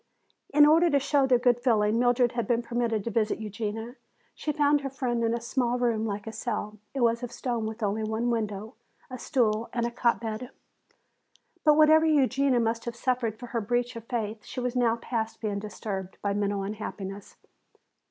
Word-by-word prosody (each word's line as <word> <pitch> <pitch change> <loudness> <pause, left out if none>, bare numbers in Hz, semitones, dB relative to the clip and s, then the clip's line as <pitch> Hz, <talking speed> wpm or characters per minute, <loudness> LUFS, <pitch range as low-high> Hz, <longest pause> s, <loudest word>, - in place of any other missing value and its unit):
In 295 +1 +7
order 325 +3 +5
to 285 - +3
show 280 0 +2
their 255 -1 +5
good 245 -1 +3
feeling, 225 -3 +2
Mildred 245 0 +3
had 235 -2 -2
been 240 -1 +1
permitted 235 -3 -1
to 230 - -3
visit 215 0 +1
Eugenia. 220 +3 -5 0.4
She 305 - -3
found 290 0 +3
her 275 - -3
friend 245 -3 -2
in 230 0 +1
a - - -2
small 240 +1 0
room 230 -3 0
like 205 -1 -4
a 225 - -5
cell. 215 -2 -4 0.2
It 270 - -1
was 235 0 +2
of 245 -1 -5
stone 240 -3 -2
with 220 +1 -6
only 210 +2 0
one 220 +3 -1
window, 215 -1 -3 0.4
a 255 - -6
stool 225 -3 0
and 235 -1 0
a 240 - -2
cot 235 0 +1
bed. 225 +2 -5 1.1
But 300 -1 +5
whatever 315 +1 +6
Eugenia 275 -3 +3
must 230 0 -1
have 235 -1 -4
suffered 240 -3 -1
for 245 - -8
her 230 - 0
breach 245 +3 -1
of 230 -1 -8
faith, 220 -3 -3
she - - -6
was 250 0 -2
now 235 -2 +3
past 230 -1 -3
being 205 -2 -2
disturbed 200 -2 -6
by 200 -1 +1
mental 200 -1 -1
unhappiness. 200 -1 -6
235 Hz, 195 wpm, -27 LUFS, 215-250 Hz, 1.1 s, In